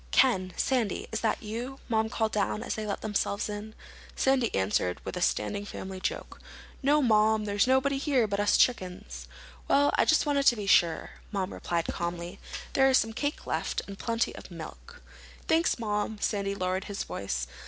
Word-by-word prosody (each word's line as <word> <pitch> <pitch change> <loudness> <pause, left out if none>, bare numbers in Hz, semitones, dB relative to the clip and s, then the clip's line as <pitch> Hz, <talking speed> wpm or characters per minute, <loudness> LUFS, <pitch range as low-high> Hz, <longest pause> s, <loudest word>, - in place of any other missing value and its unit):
"Ken—Sandy—is 225 0 +1
that 225 - 0
you?" 240 +5 -5
Mom 220 -1 +1
called 220 0 0
down 210 +1 0
as - - -2
they 215 -1 -4
let 200 - -3
themselves 205 -1 -1
in. 210 +1 -6 0.4
Sandy 265 -4 +2
answered 95 -2 +1
with - - -4
a 180 - -3
standing 205 +3 0
family 190 -2 -7
joke. - - -4 0.4
"No, 290 +2 +4
Mom. 215 -2 +4
There's 205 +3 +2
nobody 265 +1 +3
here 275 -5 +2
but 200 -1 -2
us 205 - +4
chickens." 180 - 0 0.4
"Well, 285 +1 +4
I - - +5
just 315 - +4
wanted 285 -1 +2
to 240 - +7
be 210 -2 -5
sure," 170 -4 +3 0.2
Mom 195 -2 -2
replied 170 -1 -2
calmly. 170 0 -4 0.3
"There's 270 -1 +5
some 225 0 0
cake 290 +6 -3
left—and 200 -1 -3
plenty 230 -1 0
of - - -10
milk." 485 +1 -10 0.4
"Thanks, 330 +2 +3
Mom." 210 -1 -2
Sandy 200 -1 -1
lowered 185 0 -1
his 200 -1 -4
voice. 65 -11 -3
215 Hz, 165 wpm, -29 LUFS, 190-255 Hz, 0.4 s, to